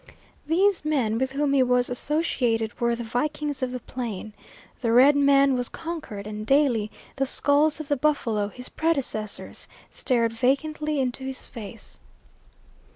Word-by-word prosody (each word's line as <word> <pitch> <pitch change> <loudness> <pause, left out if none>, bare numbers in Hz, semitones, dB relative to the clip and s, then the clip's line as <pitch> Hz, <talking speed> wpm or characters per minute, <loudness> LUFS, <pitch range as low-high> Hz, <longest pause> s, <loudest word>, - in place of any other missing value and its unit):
These 375 +4 +2
men 255 -8 0
with 265 +1 -1
whom 285 0 +1
he 275 - +4
was 250 -1 +3
associated 245 -5 -1
were 235 0 +2
the 235 - -5
vikings 290 +4 -2
of 255 - 0
the 250 0 -5
Plain. 225 -4 -6 0.5
The 230 -3 0
Red 260 +5 +7
Man 280 -1 +5
was 245 -1 -1
conquered, 310 -12 -6
and, 215 0 -5
daily, 245 -4 +2 0.3
the 270 0 +1
skulls 290 +3 +3
of 310 - -6
the 290 -1 +1
buffalo, 250 -8 +1
his 250 +5 -8
predecessors, 275 -10 -2 0.2
stared 230 -3 0
vacantly 300 +5 0
into 260 0 -2
his 265 0 -5
face. 220 -2 -8
260 Hz, 150 wpm, -25 LUFS, 230-295 Hz, 0.5 s, Red